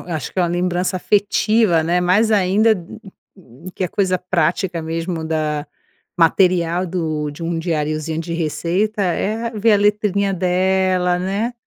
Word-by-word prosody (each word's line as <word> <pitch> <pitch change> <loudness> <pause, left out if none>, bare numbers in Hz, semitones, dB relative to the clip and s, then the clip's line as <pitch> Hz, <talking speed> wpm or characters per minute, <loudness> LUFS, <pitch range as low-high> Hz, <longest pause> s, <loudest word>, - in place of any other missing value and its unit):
eh, - - -11
eu - - -2
acho 155 - -4
que - - -6
é 180 - +4
uma 175 - +1
lembrança 180 +1 -1
afetiva, 205 -1 +2
né, 175 +3 +1
mais 205 +5 +3
ainda 210 +2 +3 1.0
que - - -4
a - - -2
coisa 185 -1 0
prática 175 0 -1
mesmo 165 +1 -3
da 155 -2 -2 0.5
material 175 0 +2
do 155 -4 -2
de 145 +4 -10
um 165 0 -2
diariozinho 155 -1 -2
de 165 0 -5
receita 175 +6 -1
é 215 +5 -1
ver 220 +1 +2
a - - +5
letrinha 200 -1 +1
dela, 185 0 +1
né. 200 +6 -2
180 Hz, 155 wpm, -19 LUFS, 165-200 Hz, 1.0 s, a